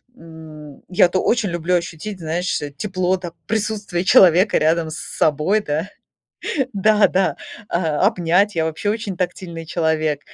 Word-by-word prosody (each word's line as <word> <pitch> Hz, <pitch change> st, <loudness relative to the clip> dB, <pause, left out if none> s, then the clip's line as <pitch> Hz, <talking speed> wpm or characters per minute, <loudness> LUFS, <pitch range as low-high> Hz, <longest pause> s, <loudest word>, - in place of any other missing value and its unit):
м, 155 Hz, -, -12 dB
я-то 180 Hz, 0 st, +3 dB
очень 230 Hz, -5 st, +1 dB
люблю 175 Hz, +1 st, -1 dB
ощутить, 175 Hz, +3 st, -4 dB
знаешь, 170 Hz, +3 st, -2 dB, 0.2 s
тепло, 185 Hz, 0 st, -1 dB
так, 175 Hz, -2 st, -8 dB
присутствие 205 Hz, -5 st, -2 dB
человека 185 Hz, +2 st, +5 dB
рядом 160 Hz, +1 st, +1 dB
с 155 Hz, -, -6 dB
собой, 155 Hz, +8 st, 0 dB
да. 155 Hz, +3 st, -3 dB, 0.8 s
Да-да, 200 Hz, -2 st, +2 dB, 0.3 s
а, 160 Hz, -4 st, 0 dB
обнять. 180 Hz, +4 st, +2 dB
Я 165 Hz, -1 st, 0 dB
вообще 160 Hz, +6 st, -2 dB
очень 210 Hz, -3 st, -4 dB
тактильный 175 Hz, -2 st, -4 dB
человек, 155 Hz, -3 st, 0 dB
175 Hz, 130 wpm, -20 LUFS, 160-195 Hz, 0.8 s, человека